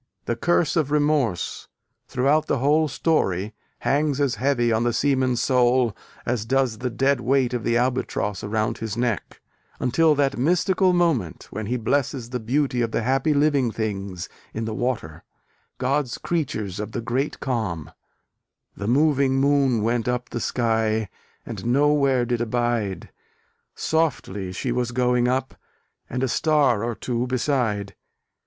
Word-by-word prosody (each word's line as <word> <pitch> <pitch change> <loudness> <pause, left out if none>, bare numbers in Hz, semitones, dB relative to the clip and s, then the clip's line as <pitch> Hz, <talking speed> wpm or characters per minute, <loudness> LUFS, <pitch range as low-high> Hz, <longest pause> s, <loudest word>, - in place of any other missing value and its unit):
The 120 - -1
curse 170 +5 +1
of 155 -5 +1
remorse, 145 - 0 0.4
throughout 145 +5 +2
the - - +1
whole 150 +5 +3
story, 105 - 0 0.3
hangs 145 0 +1
as 140 -4 +2
heavy 125 -4 +2
on 110 +1 +2
the 120 0 +1
seaman's 130 -1 +1
soul 125 -3 +3 0.3
as 120 -3 -1
does 125 -2 0
the 125 +1 -2
dead 135 +3 +1
weight 130 0 +1
of 120 -3 -2
the 115 +1 +2
Albatross 120 -5 -1
around 110 +1 -1
his 115 0 -4
neck: 120 -4 -2 0.4
until 155 +5 +3
that 140 -2 +1
mystical 180 +5 +3
moment 165 - 0
when 110 0 -4
he 125 +3 0
blesses 125 0 -1
the 125 - -2
beauty 125 +2 0
of 115 - 0
the 115 - -1
"happy 135 +5 +1
living 140 -4 +3
things" 100 -5 -4 0.3
in 110 +1 -2
the 110 - -3
water, 110 -10 -3 0.5
"God's 135 0 0
creatures 110 - -2
of 105 +1 -5
the 120 - -2
great 125 +5 -2
calm," 110 - -3 0.8
The 100 - -5
moving 140 +1 +3
Moon 135 -4 +2
went 115 +1 0
up 125 0 -1
the 120 - -3
sky, 110 -3 0 0.4
And - - -6
no 145 +4 +4
where 135 -4 +2
did 120 -1 -1
abide: 120 -4 -1 0.6
Softly 105 - -1
she 120 +7 -3
was 120 0 -1
going 125 0 +2
up, 130 +1 -1 0.6
And 125 +2 -2
a - - +2
star 135 -5 +2
or 120 -1 -2
two 120 +1 -2
beside. 120 -6 -1
125 Hz, 150 wpm, -24 LUFS, 115-140 Hz, 0.8 s, no